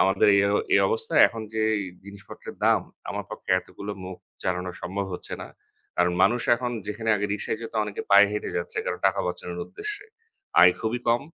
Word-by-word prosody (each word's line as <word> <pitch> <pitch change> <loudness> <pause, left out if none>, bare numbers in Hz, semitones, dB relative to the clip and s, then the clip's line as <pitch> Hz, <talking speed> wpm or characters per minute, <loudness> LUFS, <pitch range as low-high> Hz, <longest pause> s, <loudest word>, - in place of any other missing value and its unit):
আমাদের 95 +1 +4
এ - - +6 0.3
এই - - +6
অবস্থায় 110 - +3
এখন 115 -1 -7
যে 110 - +1 0.4
জিনিসপত্রের 100 -1 -11
দাম, - - +5 0.3
আমার - - -4
পক্ষে - - -7
এতগুলো 100 +2 -8
মুখ 95 0 -7 0.3
চালানো 90 0 -1
সম্ভব 95 +3 -3
হচ্ছে 90 - -7
না। - - -7 0.5
কারণ, 90 0 +3
মানুষ 120 +5 +4
এখন 125 0 -3 0.2
যেখানে 110 +2 -2
আগে 100 0 -1
রিক্সায় 105 +1 -2
যেত, 115 - -7
অনেকে 105 -1 -5
পায়ে 100 0 +7
হেঁটে 105 - -3
যাচ্ছে। 85 0 -4
কারণ - - -2
টাকা - - +1
বাঁচানোর 90 0 -5
উদ্দেশ্যে, 415 0 -6 0.6
আয় 90 - +8
খুবই 115 +2 -1
কম। 120 +3 +3
100 Hz, 180 wpm, -26 LUFS, 90-115 Hz, 0.6 s, আয়